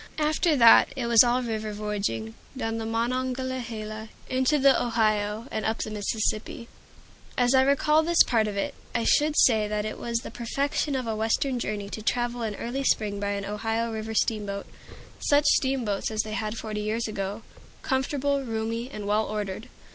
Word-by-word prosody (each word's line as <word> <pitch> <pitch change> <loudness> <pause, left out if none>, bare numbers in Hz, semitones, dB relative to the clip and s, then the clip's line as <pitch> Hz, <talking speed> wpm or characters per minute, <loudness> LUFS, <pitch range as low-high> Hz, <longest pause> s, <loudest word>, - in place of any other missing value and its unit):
After 310 +1 +2
that 235 -1 +7
it 260 -3 -3
was 235 -1 +7
all 245 +1 +1
river 220 -2 -3
voyaging, 200 - -3 0.2
down 225 -2 -2
the 225 - -4
Monongahela 235 -2 -3 0.2
into 260 +3 +2
the 275 -1 +4
Ohio, 215 -2 0
and 220 - -2
up 225 - 0
the 215 - -4
Mississippi. 215 +2 -2 0.7
As 245 +1 +3
I 260 - +6
recall 280 +3 +3
this 335 +1 +5
part 225 -3 +1
of 205 -1 -4
it, 200 - -1 0.2
I 230 - +1
should 300 +5 +3
say 220 -4 +4
that 210 0 -2
it 215 - -5
was 235 -1 -2
the - - -8
perfection 275 +4 -1
of 255 -2 -2
a 225 -1 -2
Western 225 +4 0
journey 210 -3 -3
to 220 - -6
travel 240 +2 -1
in 220 -3 -2
early 255 +6 -3
spring 210 -5 +1
by 200 0 -2
an 200 0 -4
Ohio 225 +3 -2
River 220 0 -5
steamboat, 205 -3 -1 0.5
such 290 0 +3
steamboats 260 -9 +1
as 220 -1 0
they 215 - -6
had 215 +1 -3
forty 215 -1 -4
years 220 +2 -1
ago, 205 +1 -4 0.4
comfortable, 280 +1 0
roomy, 230 +1 -3
and 210 -6 -6
well 210 +2 +1
ordered. 210 +1 -4
225 Hz, 175 wpm, -26 LUFS, 215-255 Hz, 0.7 s, that